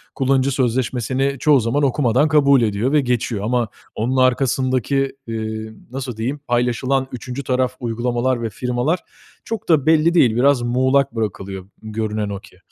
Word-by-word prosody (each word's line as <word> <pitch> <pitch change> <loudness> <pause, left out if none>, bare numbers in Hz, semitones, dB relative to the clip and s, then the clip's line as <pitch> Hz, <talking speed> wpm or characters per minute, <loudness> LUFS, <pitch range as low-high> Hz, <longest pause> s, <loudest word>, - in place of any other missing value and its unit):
kullanıcı 135 0 +2
sözleşmesini 130 +1 0
çoğu 150 -2 +4
zaman 120 +5 0
okumadan 130 0 +2
kabul 140 -4 +4
ediyor 110 +3 0
ve 150 0 +4
geçiyor 120 -5 -1
ama 120 +1 0 0.3
onun 125 +5 -1
arkasındaki, 130 +1 +1
eee, 110 -1 -4 0.2
nasıl 130 -3 -5
diyeyim, 130 +6 -3
paylaşılan 125 +2 0
3'üncü 125 +3 -6
taraf 130 0 0
uygulamalar 120 +1 -1
ve 115 - -2
firmalar 125 - -1 0.4
çok 220 -3 -6
da 155 -5 +4
belli 160 +1 +4
değil. 125 -10 +4
Biraz 130 +1 +3
muğlak 130 +3 +2
bırakılıyor 95 -3 -4
görünen 110 -1 -3
o 100 -1 -4
ki. - - -18
125 Hz, 145 wpm, -20 LUFS, 115-135 Hz, 0.4 s, çoğu